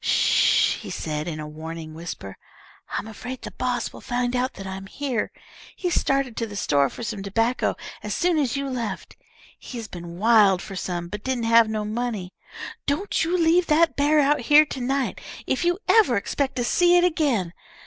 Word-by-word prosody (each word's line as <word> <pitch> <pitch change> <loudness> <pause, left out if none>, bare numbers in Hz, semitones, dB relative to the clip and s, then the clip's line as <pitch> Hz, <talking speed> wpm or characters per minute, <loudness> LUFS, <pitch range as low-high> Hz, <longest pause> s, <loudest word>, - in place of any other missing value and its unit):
"Sh!" - - +3
he - - -9
said, 155 0 -3
in 155 -2 -4
a 155 - -5
warning 160 +1 -7
whisper. 160 - -7 0.5
"I'm - - -3
afraid 245 +4 -8
the - - -6
boss 250 -2 -2
will - - -11
find 245 0 -1
out 255 +1 0
that 195 - -9
I'm 190 0 -6
here. 260 -2 -2 0.4
He 360 -2 -2
started 275 -7 +1
to 230 - -1
the 205 - -9
store 140 -8 +2
for 240 - -8
some 220 -3 -4
tobacco 225 +5 0 0.3
as - - -3
soon 345 -2 +2
as 275 -2 0
you 275 0 -2
left. 245 -4 -4 0.4
He's 230 -3 -7
been 170 -2 -9
wild 210 -3 +5
fer 195 - -8
some, 175 -2 -3
but 210 +3 -7
didn't 260 -2 -1
have 230 -1 +5
no 215 -1 -2
money. 215 -4 -3 0.5
_Don't 305 +9 0
you 345 +3 +1
leave 340 +1 +3
that 320 +1 +3
bear 295 +2 +3
out 295 +1 +3
here 295 +5 +6
to 265 - -6
night, 265 +2 -1 0.2
if 260 - 0
you 350 0 +2
ever 415 - +5
expect 270 +6 -2
to 245 - 0
see 350 +7 +4
it 350 - +4
again! 275 - +1
240 Hz, 190 wpm, -24 LUFS, 195-280 Hz, 0.5 s, here